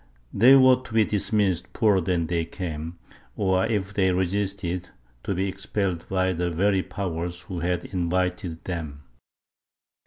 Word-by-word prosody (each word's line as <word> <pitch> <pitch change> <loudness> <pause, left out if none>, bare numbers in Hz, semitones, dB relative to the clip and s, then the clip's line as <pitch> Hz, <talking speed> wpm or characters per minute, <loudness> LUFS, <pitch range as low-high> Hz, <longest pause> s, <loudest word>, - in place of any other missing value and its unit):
They 125 +6 +7
were 130 -1 +7
to 125 - -11
be 110 -1 +5
dismissed 100 -4 0
poorer 105 -4 +3
than 85 -1 0
they 85 +1 -1
came, 80 -1 -6 0.4
or, 95 -2 +1
if 100 -3 -2
they 95 -3 +2
resisted, 90 -1 -2 0.3
to 100 - -2
be 95 +2 0
expelled 95 -2 -3
by 95 -1 +1
the 90 +1 -1
very 95 +3 +2
powers 90 -3 -4
who 90 -2 -6
had 90 +1 -1
invited 90 -1 -2
them. 80 -5 -5
95 Hz, 145 wpm, -25 LUFS, 85-100 Hz, 0.4 s, They